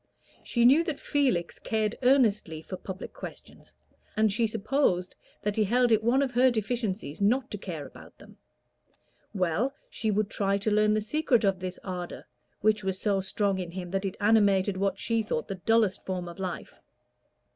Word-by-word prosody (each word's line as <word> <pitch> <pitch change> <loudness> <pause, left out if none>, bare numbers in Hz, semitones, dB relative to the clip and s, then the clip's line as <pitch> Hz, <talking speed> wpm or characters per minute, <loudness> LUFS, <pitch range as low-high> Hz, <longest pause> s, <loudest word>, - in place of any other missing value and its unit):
She 235 -1 +1
knew 280 +7 +6
that 310 -4 -3
Felix 255 -13 0
cared 215 -1 -1
earnestly 215 - +2
for 185 - -6
public 190 +1 -8
questions, - - -11 0.4
and 215 -2 +3
she 225 +2 +2
supposed 215 -4 0 0.3
that 210 0 -1
he 215 - +4
held 240 +4 +2
it 220 -1 +4
one 255 +5 +3
of 265 - -2
her 250 +2 +5
deficiencies 220 - -3
not 240 +6 +2
to 205 - -5
care 165 -7 -6
about - - -14
them: - - -16 1.0
well, 195 - 0 0.2
she 220 - -1
would 210 0 0
try 200 -1 +1
to 210 +2 -1
learn 210 0 +3
the 215 - +1
secret 250 +1 +1
of 195 -2 +2
this 185 0 -5
ardor, 180 -2 -6 0.4
which 215 0 +2
was 190 -1 -2
so 200 -2 +1
strong 195 0 -1
in 180 -2 -4
him 180 0 -6
that 195 0 -1
it 195 -2 -4
animated 205 -2 +3
what 195 +1 0
she 230 -1 +1
thought 210 -7 -3
the 190 -2 -6
dullest 225 -4 +3
form 180 -2 -4
of 170 +2 -9
life. 185 -2 -5
210 Hz, 180 wpm, -28 LUFS, 190-230 Hz, 1.0 s, knew